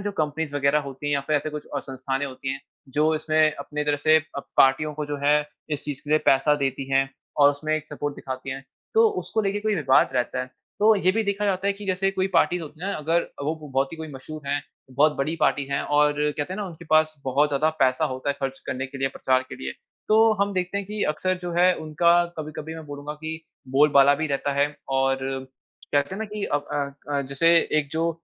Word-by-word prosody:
जो 205 - -1
कंपनीज़ 155 -2 -2
वग़ैरह 140 +1 +3
होती 135 +2 -7
हैं 145 - +1
या 140 - +1
फिर 155 - +2
ऐसे 150 +2 -2
कुछ 150 0 -7
अ, - - +1
संस्थाने 135 +1 -3
होती 135 0 -4
हैं 135 - -6 0.4
जो 155 +1 +3
इसमें 155 0 +2
अपनी 150 0 -4
तरह 145 0 +1
से 155 +2 +4 0.2
अ, - - -1 0.2
पार्टियों 145 +3 +4
को 150 0 -3
जो 145 - -3
है 145 +1 +5 0.4
इस - - -14
चीज़ 145 -2 -5
के 145 - -7
लिए 155 - +5
पैसा 135 +2 +5
देती 135 0 -3
हैं 135 0 +3 0.3
और 145 - +8
उसमें 155 +2 -2
एक 155 0 -6
सपोर्ट 145 -1 -3
दिखाती 130 0 -6
हैं 135 +1 -6 0.3
तो 450 0 +6
उसको 220 - -2
लेके 200 +1 0
कोई 215 -1 0
विवाद 140 -6 +4
रहता 125 0 0
है। 130 - -4 0.3
तो 220 +1 +6
ये 185 -1 +3
भी 225 - +1
देखा 200 +1 -1
जाता 195 -1 0
है 200 - +3
कि 200 0 -10
जैसे 190 +1 +1
कोई 190 0 0
पार्टीज़ 175 -1 +3
होती 155 +1 -10
हैं 190 - -3
ना - - -1
अ, - - -4
अगर 165 +3 0 0.2
वो 155 +3 0
बहुत 135 +2 0
ही - - -6
कोई 160 -1 -6
मशहूर 140 +2 -9
है, 145 0 0 0.3
बहुत 145 +4 +4
बड़ी 145 +4 -1
पार्टी 145 - +2
है 140 - 0
और 150 0 +3 0.2
कहते 150 +5 -3
हैं 190 - -4
ना, 200 - -3
उनके 170 -1 -10
पास 155 0 +4
बहुत 140 +3 +2
ज़्यादा 150 +3 +2
पैसा 130 -1 +3
होता 130 +2 -3
है - - -1
ख़र्च 135 0 -2
करने 130 +1 -3
के 135 +1 -9
लिए 135 - +1
प्रचार 130 -1 +1
के - - -7
लिए 65 - -3 0.4
तो 220 +1 +6
हम 200 - -1
देखते 185 +2 -1
हैं 200 - -5
कि 210 0 -3
अक्सर 185 +4 -1
जो 175 - -4
है 180 +1 +6
उनका 170 +3 +3
कभी-कभी 155 +1 -6
मैं 160 -1 -8
बोलूँगा 145 +1 -6
कि 160 +1 -4 0.3
बोल-बाला 140 0 +6
भी 155 +2 -2
रहता 140 -1 -1
है 140 +1 +3 0.3
और 135 0 +2 0.8
कहते 145 +5 +1
हैं 195 - -6
ना 220 - -2
कि 210 -1 -4
अब 145 0 -1
अ 140 0 -3
अ, - - +1
जैसे 140 +5 +1 0.3
एक 145 - -2
जो 165 +1 +1
150 Hz, 240 wpm, -25 LUFS, 140-165 Hz, 0.8 s, और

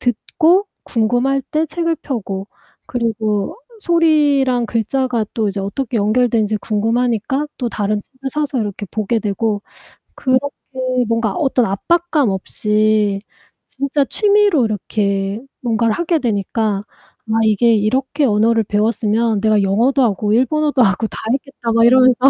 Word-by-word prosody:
듣고 335 - +2 0.2
궁금할 245 +4 +1
때 310 +1 0
책을 335 +1 -1
펴고 200 -7 -5 0.4
그리고 220 -4 -2 0.2
소리랑 295 -8 +2
글자가 230 +1 -1
또 220 -2 0
이제 195 0 -3
어떻게 230 +4 -3
연결되는지 215 0 +1
궁금하니까 235 +6 0
또 245 - -1
다른 210 -1 -1
책을 270 +3 -8
사서 295 -3 -1
이렇게 205 -1 -4
보게 215 +2 -1
되고 210 0 -1 0.5
그렇게 260 +1 +1 0.6
뭔가 230 -3 0
어떤 260 -4 +1
압박감 305 - +1
없이 210 +1 0 0.5
진짜 280 +1 -1
취미로 410 - +3
이렇게 200 -1 -2 0.2
뭔가를 230 -2 +1
하게 340 -1 0
되니까 210 -2 -1 0.5
아 225 - +2
이게 220 +2 +3
'이렇게 260 +7 0
언어를 225 +1 +3
배웠으면 215 +1 0
내가 215 -1 +3
영어도 235 +8 +2
하고 210 -2 +1
일본어도 290 +2 +2
하고 200 +2 +2
다 - - -9
했겠다.' 265 -4 -3
막 230 0 +4
이러면서 255 +1 +6
230 Hz, 300 characters per minute, -18 LUFS, 210-270 Hz, 0.6 s, 이러면서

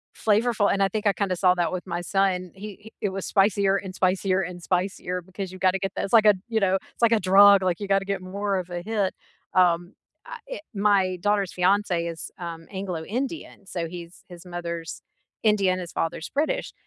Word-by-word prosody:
flavorful 215 -1 +2
and 200 - +2
I 195 - +2
think 215 +1 -1
I 200 - +4
kinda 195 -3 -1
saw 180 -1 +4
that 175 -1 0
with 185 0 -5
my 175 0 -3
son, 185 -1 0
he 195 +2 -9 0.2
he 220 - -11
it 205 - 0
was 195 0 -5
spicier 195 -1 +3
and 190 -1 -7
spicier 185 0 +1
and 175 -1 -6
spicier 180 0 -2
because 190 +1 -7
you 185 - -10
gotta 190 0 +2
get 195 -1 -2
that - - -2
it's 195 - -8
like 220 -2 +7
a, 210 -1 +7
you 225 -1 +1
know, 190 -2 +2
it's 195 - -7
like 230 0 +5
a 225 - +4
drug, 195 +1 +7
like 180 0 0
you 200 - -4
gotta 195 0 +2
get 200 -1 -2
more 200 +2 -2
of 185 -1 -4
a 175 0 -4
hit, 205 -1 -1 0.4
um, 175 -1 +3 0.3
I - - -8
it - - -6
my 195 -3 +2
daughter's 205 -2 +1
fiance 180 -2 +1
is, 165 -1 -6
um, 165 -2 -7
Anglo 190 -4 -4
Indian, 260 - -5
so 170 -3 -4
he's 170 0 -10
his 175 0 -12
mother's 170 -2 -6 0.4
Indian, 195 -4 +3
his 175 -2 -7
father's 165 0 -3
British, 295 +3 -1
190 Hz, 215 wpm, -25 LUFS, 180-205 Hz, 0.4 s, like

